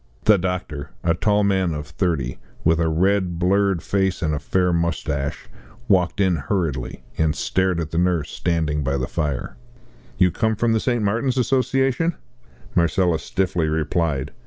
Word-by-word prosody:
The 105 -3 +5
doctor, 85 -6 -3
a 85 - +3
tall 105 +4 +2
man 95 -4 +1
of 75 0 -5
thirty, 80 -6 -2 0.2
with 80 0 +3
a 80 -1 +2
red, 90 +1 +1
blurred 95 0 +2
face 95 -1 0
and 75 -1 +1
a 75 - -1
fair 90 +4 +1
moustache, 80 -4 -2 0.4
walked 95 -3 +2
in 95 -4 +3
hurriedly, 70 - -2 0.2
and 80 -1 +2
stared 95 -2 0
at 80 -2 -4
the 80 - 0
nurse 90 -4 +1
standing 80 -4 -1
by 70 +1 0
the 65 - -1
fire. 70 0 -3 0.6
"You 90 -1 +4
come 110 +4 0
from 115 +2 +1
the 110 - +2
St. 120 -1 0
Martin's 120 +6 0
Association?" 135 +5 +1 0.6
Marcella 85 -1 +2
stiffly 90 -3 -1
replied. 80 -2 -1
90 Hz, 160 wpm, -22 LUFS, 80-100 Hz, 0.6 s, The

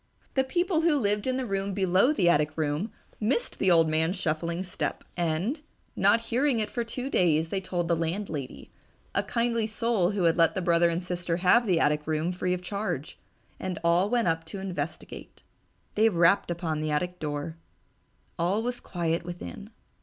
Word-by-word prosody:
The 265 - +3
people 345 +4 +1
who 325 -3 +3
lived 210 -2 0
in 255 0 +1
the 260 - -2
room 195 -2 -2
below 190 +6 +3
the 195 - +2
attic 150 -2 +2
room 155 +7 -1 0.3
missed 240 - -1
the 195 - +1
little 175 -2 +6
old 160 - +1
man's 160 +3 +1
shuffling 170 0 -2
step, 180 - -4
and, 175 - -1 0.3
not 205 +4 +4
hearing 245 +2 +1
it 215 - -2
for 240 - -1
two 245 +3 -5
days, 165 - +2
they 195 +1 -2
told 180 -2 -2
the 170 - +2
landlady, 165 -5 -4 0.4
a - - +2
kindly 230 -2 0
soul 220 -4 +1
who 200 -2 -1
had 165 0 +3
let 165 -1 +4
the - - 0
brother 170 0 +4
and 170 +2 -2
sister 175 -1 -2
have 205 +6 +4
the 175 -4 +3
attic 150 0 +1
room 155 +2 0
free 180 0 -1
of 180 - -8
charge, 180 -6 -4 0.4
and 185 -2 -3
all 170 +4 +3
went 240 -3 +1
up 165 0 +1
to 160 - -7
investigate.... 175 -6 -6 0.5
They 220 +2 +4
rapped 175 +1 +3
upon 165 -3 -2
the 155 0 -2
attic 180 +4 -1
door. 150 +1 -4 0.8
All 190 +6 +1
was 245 0 -2
quiet 170 -2 -2
within. 175 +4 -8
180 Hz, 185 wpm, -27 LUFS, 165-215 Hz, 0.8 s, little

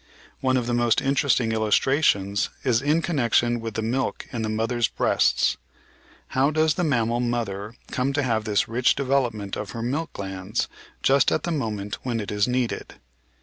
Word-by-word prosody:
One 130 -1 +2
of 125 - -1
the 120 - -1
most 120 -1 +3
interesting 135 -4 +2
illustrations 110 -2 +2
is 125 -3 +2
in 150 +4 +2
connection 120 -6 +2
with 115 -2 -6
the 110 - -1
milk 130 +4 -2
in 120 - -3
the 110 - -2
mother's 115 +1 0
breasts. - - +2 0.7
How 135 +2 +2
does 155 0 +2
the 175 - -1
mammal 120 -6 +1
mother 115 -3 -2 0.2
come 130 +1 0
to 145 0 +1
have 110 -4 0
this 105 -2 +1
rich 120 +3 +2
development 125 -7 0
of 105 - -5
her 115 - -4
milk 150 +7 -2
glands 95 0 -3 0.4
just 135 -1 +4
at - - 0
the 175 - -2
moment 105 -9 -3
when 120 -3 -2
it 105 - -4
is 105 +1 +1
needed? 125 -1 -2
120 Hz, 175 wpm, -24 LUFS, 110-135 Hz, 0.7 s, just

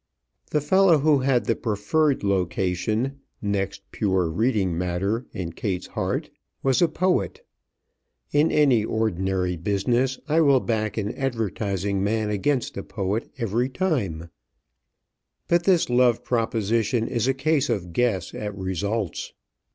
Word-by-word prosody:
The 150 - +1
fellow 185 +2 +5
who 150 0 +3
had 130 -2 +1
the - - +1
preferred 125 +7 0
location 100 +7 0 0.2
next 100 -1 -2
pure 95 -5 0
reading 100 -2 +1
matter 90 +7 -1
in 85 -3 -5
Kate's 95 0 -3
heart - - -3 0.3
was 135 +2 +2
a 175 - +6
poet. 185 - -1 0.9
In 150 +2 +3
any 135 -7 +4
ordinary 95 -5 -1
business 120 +9 0
I 155 +2 +3
will 140 -4 +5
back 110 -3 -2
an 105 +1 -2
advertising 100 -6 -2
man 110 +1 0
against 125 +6 -1
a - - -2
poet 100 +2 -3
every 115 +3 0
time, 105 - -2 1.2
but 170 0 +2
this 185 -4 +4
love 125 -1 +3
proposition 115 -1 0
is 120 +1 -1
a 135 - +3
case 145 0 +1
of 90 -7 -2
guess 100 -6 0
at 105 -1 -5
results. 95 +1 -3
110 Hz, 130 wpm, -24 LUFS, 95-135 Hz, 1.2 s, a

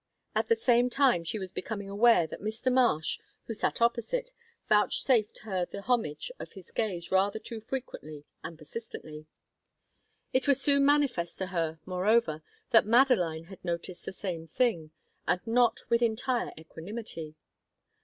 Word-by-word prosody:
At - - 0
the 460 - +4
same 245 - +3
time 250 -9 +3
she 170 +6 -3
was 190 -3 -6
becoming 200 +1 -5
aware 205 -2 +5
that 160 - -8
Mr. 220 +5 -1
Marsh, 240 -12 +2 0.3
who 225 - -4
sat 225 - 0
opposite, 240 - 0 0.4
vouchsafed 215 +1 +3
her 190 -5 -1
the 200 - -8
homage 235 - -1
of - - -8
his 190 -5 -13
gaze 185 -7 -2
rather 195 +3 +3
too 225 0 -7
frequently 155 - -6 0.2
and 165 - -7
persistently. 155 -3 -8 1.1
It 260 +1 +1
was 280 -1 +4
soon 280 0 +4
manifest 275 -13 +2
to 190 - -2
her, 165 -2 -1
moreover, 185 -2 +2 0.3
that 225 -3 +6
Madeline 220 -10 +4
had 190 +2 -13
noted 175 0 -3
the - - -5
same 175 -4 -5
thing, 170 -5 0 0.4
and 180 - +2
not 235 0 +3
with 235 0 +4
entire 240 +2 0
equanimity. 160 0 -7
215 Hz, 150 wpm, -29 LUFS, 170-240 Hz, 1.1 s, that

